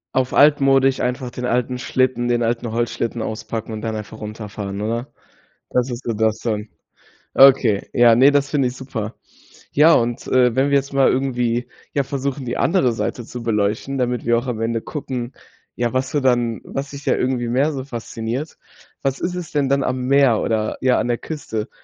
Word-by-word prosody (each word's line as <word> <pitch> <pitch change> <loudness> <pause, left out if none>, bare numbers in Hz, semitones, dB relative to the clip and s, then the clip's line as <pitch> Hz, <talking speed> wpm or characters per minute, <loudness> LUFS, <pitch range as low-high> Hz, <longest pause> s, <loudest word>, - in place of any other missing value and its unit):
Auf 130 -1 +1
altmodisch, 135 -2 +4
einfach 125 +1 -2
den 125 +1 -5
alten 125 +1 0
Schlitten 130 -1 0
den 120 0 +1
alten 115 0 -1
Holzschlitten 115 0 -2
auspacken 110 +1 -5
und 110 - -5
dann 110 -1 -3
einfach 110 0 -7
runterfahren, 105 -2 -6
oder? 115 +4 -3 0.6
Das 125 +1 0
ist 120 +1 -5
so 115 - -2
das 110 0 +1
dann. 110 -2 -3 0.7
Okay, 130 -6 +5
ja, 120 -1 +6
ne, 130 +4 +6
das 140 -1 +1
finde 140 -4 +2
ich 125 - -8
super. 120 -5 -5 0.6
Ja 155 +3 +6
und, 120 -1 0
äh, 125 -2 +3
wenn 135 +2 +3
wir 140 - +3
jetzt 140 0 +1
mal 135 -1 +4
irgendwie, 125 -2 0 0.2
ja, 140 - +1
versuchen, 140 0 -3
die 120 - -3
andere 165 -9 +2
Seite 120 +1 -3
zu 120 +1 -8
beleuchten, 110 +4 -1
damit 125 -1 -1
wir 120 0 +3
auch 120 +3 -3
am 120 -3 -3
Ende 115 0 -1
gucken, 130 -4 -5 0.4
ja, 120 0 -1
was 130 0 -1
du 150 - +1
dann 120 -4 +1
was 135 +1 -5
dich 140 0 -9
da - - +3
irgendwie 125 -2 -1
mehr 135 +6 +2
so 135 -3 -5
fasziniert. 120 +3 -5 0.5
Was 135 -1 -1
ist 180 +1 -2
es 180 -3 -6
denn 145 -3 +1
dann 140 0 +2
am 130 0 -1
Meer 135 -4 +4
oder 110 -1 -1
ja, 130 -1 +3
an - - -1
der 120 -1 0
Küste? 115 -8 -5
125 Hz, 195 wpm, -20 LUFS, 115-135 Hz, 0.7 s, ja